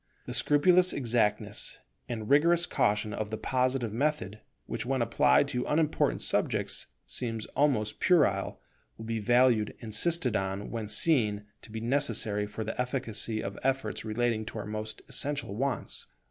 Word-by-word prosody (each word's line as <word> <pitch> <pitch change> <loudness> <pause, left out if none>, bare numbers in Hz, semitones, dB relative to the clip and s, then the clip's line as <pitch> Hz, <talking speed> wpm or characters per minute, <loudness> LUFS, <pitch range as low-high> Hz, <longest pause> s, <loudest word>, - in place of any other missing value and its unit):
The - - -6
scrupulous 180 +5 +4
exactness 115 -5 0 0.3
and 110 -3 -4
rigorous 170 +5 +4
caution 105 -4 0
of 105 0 -3
the 110 - -4
Positive 125 -1 0
method, 135 -5 -1 0.3
which - - -4
when 130 +2 -1
applied 120 +4 +3
to 125 -3 -1
unimportant 150 - +1
subjects - - 0 0.2
seem 115 -3 -3 0.2
almost 130 -8 +1
puerile, 145 - +2 0.4
will 110 - -8
be 115 0 -2
valued 120 -1 +3
and - - -32
insisted 125 +3 0
on 95 +1 -2
when 115 -2 -4
seen 105 -4 +2 0.2
to - - -14
be 110 0 -5
necessary 115 -5 0
for 105 +2 -5
the 110 +3 -3
efficacy 115 -4 -2
of 100 0 -5
efforts 135 0 -1
relating 110 0 0
to 110 - -7
our 105 - -4
most 110 0 -6
essential 140 -4 -1
wants. 130 -1 -3
115 Hz, 150 wpm, -29 LUFS, 105-135 Hz, 0.4 s, scrupulous